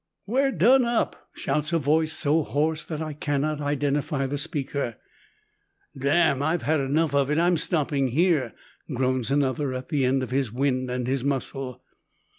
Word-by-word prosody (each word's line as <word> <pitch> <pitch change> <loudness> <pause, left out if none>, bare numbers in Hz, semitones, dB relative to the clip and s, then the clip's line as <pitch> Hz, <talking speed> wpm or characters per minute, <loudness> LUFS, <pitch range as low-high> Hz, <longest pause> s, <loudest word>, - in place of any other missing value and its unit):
"We're 270 +5 +1
done 245 +8 +5
up," 235 -1 -1
shouts 150 +2 -2
a - - +4
voice 155 +1 +1
so 155 +1 +2
hoarse 155 +2 -1
that 160 -1 -4
I 155 -1 -5
cannot 145 +1 -1
identify 145 -1 0
the 140 +2 -3
speaker. 140 -5 -3 1.0
"Damn! 140 +1 +2
I've 160 +3 0
enough 150 0 +1
of 140 -1 +2
it, 150 - +1
I'm 175 +1 +3
stopping 150 -4 0
here," 145 -2 +1 0.4
groans 130 -2 0
another, 140 -1 0
at 130 0 -6
the 145 -3 +1
end 130 +1 +1
of 125 - -6
his 130 -4 0
wind 130 0 0
and 125 0 -2
his 130 0 -1
muscle. 135 -2 -3
145 Hz, 160 wpm, -25 LUFS, 135-155 Hz, 1.0 s, done